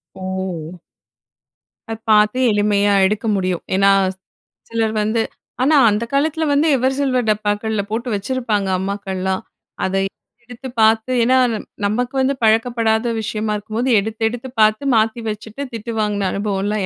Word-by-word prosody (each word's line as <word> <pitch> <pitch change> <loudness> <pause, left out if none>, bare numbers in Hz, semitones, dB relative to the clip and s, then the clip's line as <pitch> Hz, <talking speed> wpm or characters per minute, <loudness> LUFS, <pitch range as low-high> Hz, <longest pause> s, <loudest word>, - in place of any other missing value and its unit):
ஓ! 185 -3 -5 1.1
அத 225 - -2 0.2
பார்த்து 210 +3 +4
எளிமையா 205 -1 +2
எடுக்க 210 +3 -1
முடியும். 185 -2 -1
ஏன்னா, 195 +1 +4 0.8
சிலர் 225 -1 -1
வந்து 220 +2 +1 0.4
ஆனா 300 +4 +4
அந்த 210 +2 0
காலத்தில 310 +3 +1
வந்து 290 +3 +3
எவர் 260 +1 +1
சில்வர் 255 -4 0
டப்பாக்கள்ல 210 0 0
போட்டு 235 +3 -2
வச்சிருப்பாங்க 210 -1 -1
அம்மாக்கள்லாம். 190 -1 -3 0.4
அத 190 +1 -2 0.5
எடுத்து 245 +2 -9
பார்த்து 220 +3 +3
ஏன்னா 260 +2 +4 0.5
நமக்கு 245 +5 -1
வந்து 270 +1 +1
பழக்கப்படாத 225 0 +2
விஷயமா 215 0 -2
இருக்கும்போது, 220 +5 -3
எடுத்து, 220 +2 -5
எடுத்து 245 +2 -7
பார்த்து 215 +5 +3
மாத்தி 225 +1 +1
வச்சுட்டு, 220 +5 -7
திட்டு 230 +1 -5
வாங்குன 205 -2 0
அனுபவமெல்லாம் 200 0 -1
215 Hz, 130 wpm, -19 LUFS, 200-240 Hz, 1.1 s, பார்த்து